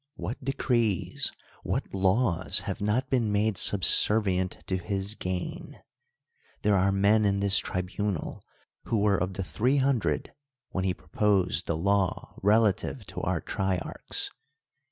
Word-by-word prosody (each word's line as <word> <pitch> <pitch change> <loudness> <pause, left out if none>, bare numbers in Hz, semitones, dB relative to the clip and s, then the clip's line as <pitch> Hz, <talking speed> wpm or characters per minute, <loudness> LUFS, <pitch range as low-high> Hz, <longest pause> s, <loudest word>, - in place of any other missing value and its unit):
What 105 +10 -6
decrees, 120 -7 0 0.3
what - - -3
laws 95 -1 +1
have - - -5
not 110 +6 0
been 120 -5 +1
made 105 +1 +1
subservient 95 -1 +4
to 95 - -1
his 95 +3 -3
gain? 90 -4 -5 0.8
There 105 - +3
are 95 +1 +3
men 100 +3 +3
in 100 -1 +1
this 100 0 +4
tribunal 90 0 -3 0.4
who 115 - 0
were 100 -1 +3
of 95 +1 -2
the 95 - -3
Three 125 +9 0
Hundred 125 - 0 0.4
when 95 0 -2
he 90 -1 0
proposed 90 +1 0
the 85 - -1
law 100 +1 0
relative 105 0 +2
to - - -4
our - - -1
trier 95 -1 -1
archs. - - -3
100 Hz, 135 wpm, -27 LUFS, 95-105 Hz, 0.8 s, subservient